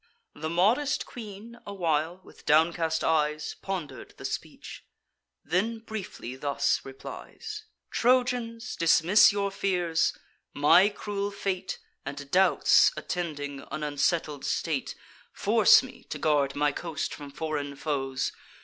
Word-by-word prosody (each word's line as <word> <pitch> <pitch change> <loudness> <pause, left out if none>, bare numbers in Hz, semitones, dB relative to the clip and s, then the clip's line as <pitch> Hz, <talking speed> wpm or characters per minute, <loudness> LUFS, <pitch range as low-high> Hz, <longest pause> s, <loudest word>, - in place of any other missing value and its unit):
The 160 - -4
modest 215 - +2
queen 225 +1 -10
a 200 - -7
while, 165 0 0
with - - -18
downcast 160 +1 +3
eyes, 150 -1 +1
Ponder'd 170 -9 -6
the - - -9
speech; - - -6 0.6
then 195 +8 0
briefly 220 - -7
thus 140 +1 0
replies: 425 - -8 0.3
"Trojans, 245 -1 +1
dismiss 170 +5 +6
your 200 -1 -1
fears; 180 -4 0 0.4
my 175 +7 +6
cruel 205 -1 -3
fate, 195 -2 -3 0.3
And 140 0 -7
doubts 190 +1 +5
attending 145 -5 -4
an 155 - -4
unsettled 150 0 0
state, 155 -5 -2 0.4
Force - - +5
me - - -11
to - - -5
guard 145 -3 +1
my 145 0 +2
coast 160 0 -4
from 145 -1 -8
foreign 145 -1 -4
foes. 135 -3 -2
165 Hz, 120 wpm, -28 LUFS, 150-200 Hz, 0.6 s, dismiss